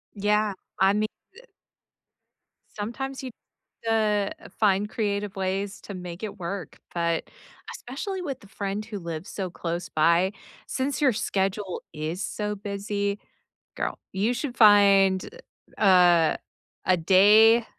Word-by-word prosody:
Yeah, 210 +1 +1 0.3
I 190 +1 +5
mean 210 +1 +1 0.3
uh - - -15 1.3
sometimes 265 +6 -5
you 260 - -5 0.5
the 210 -3 +1
uh, - - -11
find 205 -1 +3
creative 205 -2 -2
ways 195 +1 -2
to 200 - -8
make 180 0 -7
it 210 -1 -5
work, 185 +1 -6
but 170 -1 -1 0.4
especially 370 +10 -5
with 275 -7 -5
the 200 - -15
friend 200 +1 -4
who 210 -2 -6
lives 170 0 -6
so 190 -2 -4
close 170 0 -4
by, 170 +5 +3 0.3
since 270 +2 -2
your 270 -4 +4
schedule 195 -2 -2
is 155 +4 -4
so 210 +3 -3
busy, 200 0 -3 0.6
girl, - - -3
you 205 +5 +1
should 255 0 -4
find, 200 -3 +6 0.5
uh, - - -3 0.3
a 160 -2 +2 0.5
a 185 - +4
day, 210 +7 +6
200 Hz, 130 wpm, -26 LUFS, 190-215 Hz, 1.3 s, find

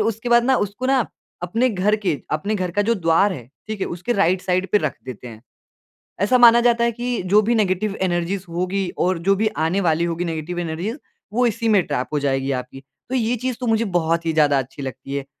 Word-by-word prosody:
उसके 225 +2 -1
बाद 235 0 +5
ना 265 +1 +3
उसको 230 +6 -5
ना 265 -4 +3 0.4
अपने 230 +9 +1
घर 205 +2 +1
के 205 -7 -1 0.2
अपने 200 +8 -1
घर 185 -3 -2
का 205 +4 +1
जो 230 +2 +1
द्वार 180 +2 +2
है, 125 -8 -8 0.2
ठीक 215 -2 -4
है? - - 0
उसके 180 +8 -3
राइट 185 -3 +2
साइड 185 0 0
पे 210 - +6
रख - - -2
देते 125 -1 -8
हैं। 110 0 -12 0.8
ऐसा 250 +5 +4
माना 235 -1 +8
जाता 235 -1 +3
है 235 - +2
कि 240 -1 -3
जो 210 +1 +6
भी 235 - +3
नेगेटिव 200 0 0
एनर्जीज़ 180 +1 -1
होगी 185 +2 -1 0.2
और 185 -1 +1
जो 195 - +5
भी 215 +2 +1 0.2
आने 190 +5 +1
वाली 165 -1 +1
होगी 170 +1 -2
नेगेटिव 165 +1 -4
एनर्जीज़, 175 - -3 0.4
वो 245 +2 +2
इसी 230 +1 -2
में 205 -3 +5
ट्रैप 135 -3 -2
हो 150 - +1
जाएगी 135 -1 0
आपकी। 130 +2 -13 0.3
तो 260 - -2
ये 240 0 +1
चीज़ 255 -2 -1
तो 250 - -3
मुझे 225 0 +2
बहुत 165 0 0
ही 160 - 0
ज़्यादा 145 -3 +3
अच्छी 135 +2 -7
लगती 135 +1 -6
है 140 - -3
190 Hz, 230 wpm, -21 LUFS, 165-225 Hz, 0.8 s, माना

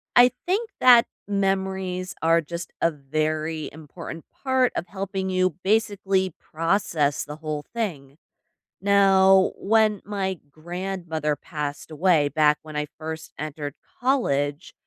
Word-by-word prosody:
I 245 0 +8
think 420 +6 0
that 245 -1 +8 0.2
memories 190 -2 -1
are 165 +1 +4
just 170 +2 -7
a 165 - +3
very 155 +2 -2
important 160 +2 -9 0.2
part 260 -2 +3
of 175 - -3
helping 190 0 -3
you 185 -3 +1
basically 195 -3 +1
process 165 -3 0
the 150 +1 -8
whole 155 -2 -4
thing. 155 -11 -4 0.6
Now, 195 -1 +5
when 215 -1 +2
my 190 -3 -2
grandmother 170 -2 -3
passed 145 -1 -5
away 155 -2 +3
back 150 0 +3
when 155 -1 -10
I 150 0 -1
first 160 0 -6
entered 150 -1 -5 0.3
college, 145 - 0
175 Hz, 120 wpm, -24 LUFS, 155-195 Hz, 0.6 s, I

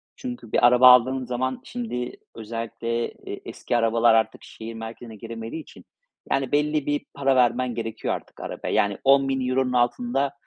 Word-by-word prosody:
çünkü 250 -1 -7
bir 120 - +6
araba 125 +1 +7
aldığım 130 +1 +3
zaman 130 +1 -2
şimdi 225 - -4 0.2
özellikle, 115 +1 -4
eee, - - -9
eski 120 - -2
arabalar 115 0 +4
artık 110 -1 +1
şehir 115 +1 -9
merkezine 115 0 -8
giremediği 115 +7 -7
için. - - -16 0.5
Yani, 135 -2 0
belli 150 0 +1
bir 145 0 -1
para 135 -1 +1
vermen 125 0 +2
gerekiyor 115 -1 -3
artık - - -11
arabaya. - - -5
Yani, 100 -1 +2
€10.000'nun 135 -2 +2
altında 125 +3 +1
125 Hz, 150 wpm, -24 LUFS, 115-135 Hz, 0.5 s, araba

